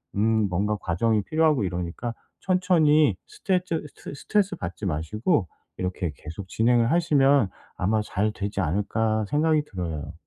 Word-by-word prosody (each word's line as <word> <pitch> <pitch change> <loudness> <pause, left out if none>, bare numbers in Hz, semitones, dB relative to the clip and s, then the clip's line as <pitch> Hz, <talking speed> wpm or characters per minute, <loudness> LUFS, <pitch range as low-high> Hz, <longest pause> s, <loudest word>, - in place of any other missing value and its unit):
음 100 - 0 0.3
뭔가 100 +4 0
과정이 105 +4 0
필요하고 155 -6 +2
이러니까 90 +6 -4 0.3
'천천히 170 -5 +3
스트레트 185 - -1
스트 - - -10
스트레스받지 140 - -2
마시고 95 - 0 0.3
이렇게 90 -3 -2
계속 85 +5 -9
진행을 120 +1 +2
하시면 140 - +3 0.3
아마 110 +4 +1
잘되지 105 -1 -2
않을까?' 110 +5 0
생각이 155 +3 +2
들어요. 85 - -5
110 Hz, 335 characters per minute, -25 LUFS, 95-155 Hz, 0.3 s, 천천히